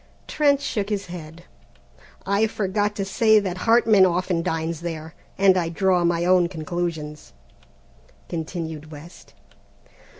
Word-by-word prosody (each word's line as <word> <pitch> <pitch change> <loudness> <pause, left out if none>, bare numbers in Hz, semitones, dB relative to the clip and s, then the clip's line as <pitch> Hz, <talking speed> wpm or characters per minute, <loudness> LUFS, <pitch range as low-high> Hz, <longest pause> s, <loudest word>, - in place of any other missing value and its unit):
Trent 285 -2 +2
shook 210 -7 -2
his 200 -2 -2
head. 165 0 -10 0.8
"I 200 +3 +2
forgot 205 0 -1
to 195 - -2
say 220 +3 +3
that 190 -4 -1
Hartman 225 -4 +5
often 180 -1 +1
dines 165 0 -3
there, 160 -2 -6 0.2
and 190 -1 +5
I 170 -3 0
draw 180 +1 +1
my 170 0 +1
own 180 -1 +4
conclusions," 160 - -5 0.9
continued 160 -2 -5
West. 155 +3 -13
175 Hz, 125 wpm, -23 LUFS, 165-200 Hz, 0.9 s, Hartman